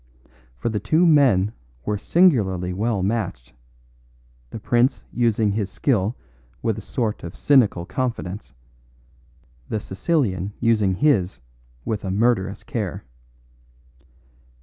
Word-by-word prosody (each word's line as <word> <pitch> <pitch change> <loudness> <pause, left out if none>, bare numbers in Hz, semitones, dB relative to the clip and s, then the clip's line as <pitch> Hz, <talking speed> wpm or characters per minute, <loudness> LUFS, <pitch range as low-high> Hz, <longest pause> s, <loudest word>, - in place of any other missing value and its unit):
For 65 - -2
the 105 -2 -1
two 155 - +2
men 125 - +4 0.3
were 105 -1 -1
singularly 100 - +2
well 105 0 -1
matched, 95 - -3 1.0
the - - -7
prince 120 +4 +1
using 115 -3 +2
his 100 -1 -2
skill 110 -2 0 0.5
with 110 -1 0
a - - -8
sort 110 0 -3
of 85 - -7
cynical 115 -11 +3
confidence, 105 - -4 1.1
the 110 - -1
Sicilian 100 - -1
using 110 -5 +2
his 100 - +2 0.5
with 110 -2 -2
a 95 - -3
murderous 100 -1 +1
care. 105 -4 -4
105 Hz, 110 wpm, -22 LUFS, 95-120 Hz, 1.1 s, men